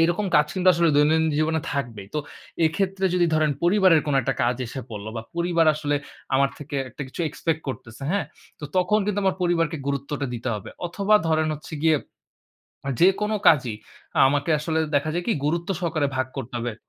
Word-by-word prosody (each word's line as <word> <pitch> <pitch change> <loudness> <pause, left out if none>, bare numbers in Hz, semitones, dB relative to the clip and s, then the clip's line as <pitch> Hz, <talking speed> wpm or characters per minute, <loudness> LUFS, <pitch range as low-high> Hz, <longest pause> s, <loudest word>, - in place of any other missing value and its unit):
এরকম 175 +5 +1
কাজ 150 0 +4
কিন্তু 185 -1 +2
আসলে 170 -1 +3
দৈনন্দিন 160 +2 +4
জীবনে 160 0 +1
থাকবেই। 115 -8 -4
তো - - +1 0.5
এক্ষেত্রে 195 +3 -1
যদি 175 -1 +3
ধরেন 155 -1 +3
পরিবারের 185 -2 +5
কোন 145 - 0
একটা - - -1
কাজ 120 0 +1
এসে 130 +3 -6
পড়ল 105 -1 -7
বা 115 - -4
পরিবার 170 -1 +2
আসলে 145 -1 -1 0.4
আমার 140 +1 +3
থেকে 145 -1 -6
একটা 140 - -7
কিছু 150 - -7
এক্সপেক্ট 160 +1 -2
করতেছে, 120 0 -7
হ্যাঁ? 200 -8 0 0.3
তো - - -5
তখন 185 +4 +3
কিন্তু 205 0 -1
আমার 190 -1 +2
পরিবারকে 165 -3 +1
গুরুত্বটা 140 0 -2
দিতে 120 +2 -4
হবে। 105 - -7 0.2
অথবা 200 +4 +1
ধরেন 155 0 +2
হচ্ছে 150 - -12
গিয়ে, 160 -1 +4 0.9
আ - - -2
যেকোনো 200 +4 +3
কাজই 125 -6 +3 0.5
আমাকে 145 +3 0
আসলে 160 +1 -1 0.2
দেখা 145 +2 +2
যায় 175 0 -2
কি? 230 - +2
গুরুত্ব 170 +3 -1
সহকারে 155 -5 0
ভাগ 130 -1 0
করতে 130 0 -6
হবে 120 -1 -3
155 Hz, 185 wpm, -24 LUFS, 140-175 Hz, 0.9 s, পরিবারের